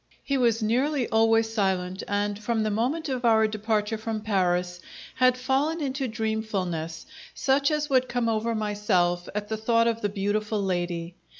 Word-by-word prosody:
He 275 - -1
was 235 -3 +2
nearly 255 +4 +1
always 225 0 +3
silent, 190 -3 0
and, 205 0 -1
from 220 +1 -1
the 215 - 0
moment 260 +10 -1
of 255 -2 -3
our 220 -2 +5
departure 215 0 -1
from 220 -1 -3
Paris, 180 -4 0 0.3
had 255 -1 +3
fallen 270 +6 0
into 270 -2 -2
dreamfulness, 210 -8 -3 0.3
such 275 +1 +2
as 300 -1 0
would 260 -3 +2
come 245 -1 0
over 225 +1 0
myself 205 -5 0
at 210 0 -2
the 220 - -3
thought 230 +1 +2
of 230 0 -1
the 205 - 0
beautiful 210 +2 -1
lady. 175 -3 -2
220 Hz, 165 wpm, -26 LUFS, 205-245 Hz, 0.3 s, our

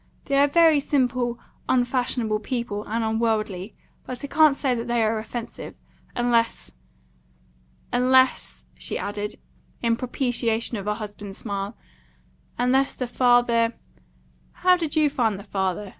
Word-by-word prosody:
They 280 - 0
are 285 - +6
very 320 0 +5
simple, 250 -4 0 0.3
unfashionable 245 -3 +1
people, 235 -3 -3
and 225 +2 -1
unworldly; 220 -3 -1 0.3
but 250 0 -7
I - - -3
can't 310 -1 +5
say 270 -2 0
that 235 0 -3
they 235 -1 +1
are 220 0 +1
offensive, 225 +1 -7 0.4
unless 235 -1 +1 1.2
unless," 260 +1 +2
she - - -2
added, 205 +1 -4 0.5
in 230 -1 +3
propitiation 235 -2 -1
of 200 - -6
her 210 0 0
husband's 205 -2 -8
smile, 200 0 -4 0.8
"unless 260 +3 +2
the 255 - -3
father 240 -2 +3 0.9
how 365 0 +7
did 330 -4 -3
you 310 -1 +4
find 230 -8 0
the - - -9
father?" 195 0 -2
235 Hz, 130 wpm, -24 LUFS, 215-255 Hz, 1.2 s, how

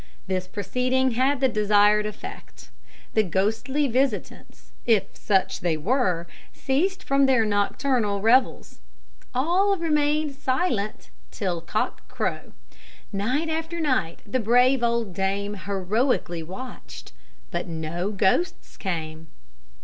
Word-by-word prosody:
This 185 -1 -2
proceeding 255 +6 0
had 260 +3 +1
the 265 - +5
desired 210 -1 +3
effect. 210 - -10 0.4
The 220 - +4
ghostly 220 - 0
visitants, 255 -2 -2 0.2
if 220 -5 +2
such 195 -3 +1
they 170 -3 0
were, 180 - +1 0.3
ceased 370 +9 -1
from 275 0 +3
their 255 -4 +4
nocturnal 205 +1 +1
revels. 245 +5 +2 0.6
All 365 +9 +2
remained 300 -2 +1
silent 255 - -1 0.2
till 180 -5 -3
cock 170 - -3
crow. - - -3 0.6
Night 250 +11 0
after 325 +1 -3
night 255 - 0
the 235 +5 -1
brave 245 +3 +4
old 235 -4 0
dame 195 +2 -1
heroically 200 -1 -1
watched, 175 - -9 0.4
but - - -3
no 165 +3 -3
ghosts 205 - 0
came. 160 -4 -4
225 Hz, 110 wpm, -25 LUFS, 195-270 Hz, 0.6 s, the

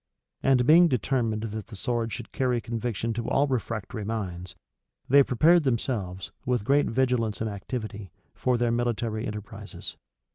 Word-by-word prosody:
And 130 -2 +3
being 170 +5 +7
determined 120 -5 0
that 110 -1 -5
the 115 - -10
sword 115 +3 -1
should - - -7
carry 125 -2 +1
conviction 115 -1 -3
to 115 0 -3
all 140 - +3
refractory 115 -5 -3
minds, 95 -4 -4 0.5
they 140 +2 +7
prepared 155 +7 +5
themselves, 110 -8 -2
with 125 -4 0
great 145 +3 +3
vigilance 120 -3 +1
and 110 - -1
activity, 105 -1 -5 0.2
for 125 -1 +1
their 120 0 +1
military 120 -1 -1
enterprises. 105 -1 -7
115 Hz, 145 wpm, -27 LUFS, 110-125 Hz, 0.5 s, being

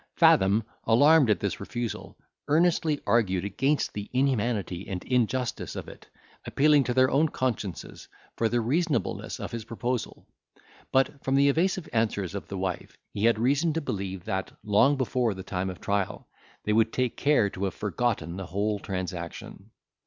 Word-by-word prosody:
Fathom, 100 +4 +5 0.2
alarmed 145 +4 +5
at 105 - +3
this 100 - -2
refusal, 120 +3 -5 0.3
earnestly 160 -1 +2
argued 100 -4 +2
against 135 +9 0
the 105 -1 -6
inhumanity 115 -8 0
and 90 -2 -4
injustice 125 -1 -1
of - - -6
it, - - -13 0.4
appealing 150 0 +4
to 125 - -1
their 130 0 +4
own 150 +4 +3
consciences 115 - -4 0.3
for 115 - +1
the 120 +1 +1
reasonableness 150 +7 -1
of - - -5
his 115 -1 -5
proposal; 120 +2 -4 0.7
but, 135 +1 +1
from 135 - +1
the 140 +1 +5
evasive 175 +3 +1
answers 105 -5 0
of 100 - -6
the 100 - -5
wife, 95 -2 -4 0.2
he 105 - 0
had 115 -1 +4
reason 140 +8 +2
to 165 - 0
believe, 95 - -4
that, 95 0 -3
long 115 +7 +4
before 125 -4 0
the 95 - -7
time 95 0 -3
of 90 - -7
trial, 100 -1 -2 0.4
they 105 - 0
would 110 +1 +3
take 125 -2 -1
care 145 -7 +3
to 95 - -3
have 95 - -3
forgotten 105 -5 -2
the 95 -2 -6
whole 105 +3 -1
transaction. 90 -3 -6
115 Hz, 165 wpm, -27 LUFS, 100-135 Hz, 0.7 s, Fathom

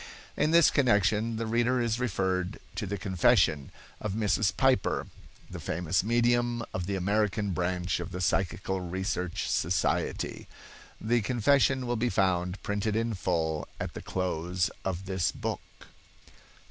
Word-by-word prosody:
In 150 - +2
this 170 0 +6
connection 110 -3 +2
the 115 +1 -2
reader 120 +3 +1
is 120 -1 0
referred 95 -5 -1 0.2
to 105 - -4
the 100 +2 -3
confession 85 -6 +2 0.3
of 105 -3 -3
Mrs. 105 -2 +1
Piper, 130 -8 +2 0.4
the - - -8
famous 85 +2 0
medium 120 +1 +2
of 90 -1 -3
the 100 - -1
American 105 +2 0
branch 90 +1 -1
of 85 +1 -6
the 90 - -5
Psychical 95 +1 0
Research 90 0 -3
Society. 90 +3 -1 0.5
The 115 +2 +1
confession 130 +3 +2
will 120 0 -1
be 120 +2 +1
found 95 -3 0
printed 105 +1 -1
in 115 0 0
full 80 -5 -1
at - - -4
the - - -7
close 90 0 -1
of 95 0 -3
this 95 -2 0
book. - - -4
100 Hz, 140 wpm, -29 LUFS, 90-115 Hz, 0.5 s, this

